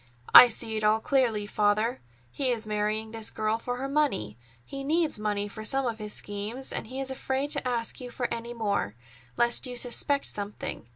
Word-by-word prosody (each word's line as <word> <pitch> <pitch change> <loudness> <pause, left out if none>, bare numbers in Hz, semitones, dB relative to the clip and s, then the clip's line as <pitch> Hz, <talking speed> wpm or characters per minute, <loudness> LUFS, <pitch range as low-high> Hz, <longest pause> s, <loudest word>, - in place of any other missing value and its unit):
"I 250 - +12
see 225 -1 -1
it 215 - -3
all 215 +1 +3
clearly, 235 -5 +1
Father. 210 +4 0 0.3
He 270 -2 -1
is 230 -3 0
marrying 215 +1 -2
this 225 -1 -2
girl 215 +1 -1
for 245 +1 -4
her 270 +2 -3
money. 275 - 0 0.3
He 275 0 -7
needs 315 -3 0
money 205 -1 -1
for 215 +1 -8
some 270 +4 +2
of 230 -2 -3
his 210 -1 -5
schemes, 210 +7 -1
and - - -4
he 260 +3 -6
is 265 -1 -3
afraid 265 +2 -2
to 280 -3 +1
ask 235 0 -2
you 250 - -7
for 245 0 -3
any 235 +1 -6
more, 200 - -1 0.4
lest 240 +2 +3
you 250 - -6
suspect 260 +4 +1
something. 205 - -6
230 Hz, 195 wpm, -27 LUFS, 215-265 Hz, 0.4 s, I